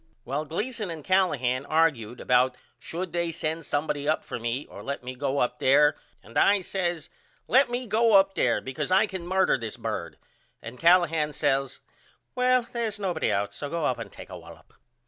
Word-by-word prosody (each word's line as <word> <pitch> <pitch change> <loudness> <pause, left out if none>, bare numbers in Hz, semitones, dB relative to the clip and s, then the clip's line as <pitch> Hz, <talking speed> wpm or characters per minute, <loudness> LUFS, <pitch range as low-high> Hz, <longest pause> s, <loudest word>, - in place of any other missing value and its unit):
Well 145 +3 -2
Gleason 210 - -3
and 160 -3 -7
Callahan 140 -9 +1
argude 135 -8 +1
about 125 0 +2 0.2
should 175 +2 -5
they 170 -1 -1
send 160 0 -3
somebody 145 -1 -2
up 155 - +1
for - - -6
me 120 +4 -3
or - - -11
let 140 -2 -5
me 125 +1 -5
go 135 +2 -2
up 125 -1 0
there 145 +3 +4 0.3
and - - -2
I 200 -1 +4
says 175 -4 -3 0.4
Let 260 +3 +4
me 245 +1 -2
go 225 +1 +2
up 195 0 +6
there 120 -10 +1
because 130 +5 -4
I 190 +3 +5
can 190 -4 -7
murder 190 -6 +2
this 115 -2 -6
bird - - -5 0.4
and 120 +2 -10
Callahan 165 -3 +3
says 135 -3 -1 0.5
Well 255 0 +3
they 235 0 -4
is 215 -1 -5
nobody 180 -5 -1
out 100 +1 -1
so 145 - -6
go 165 -1 -2
up 125 - 0
and - - -7
take - - -12
a - - -7
wallop. - - -15
160 Hz, 190 wpm, -26 LUFS, 135-190 Hz, 0.5 s, up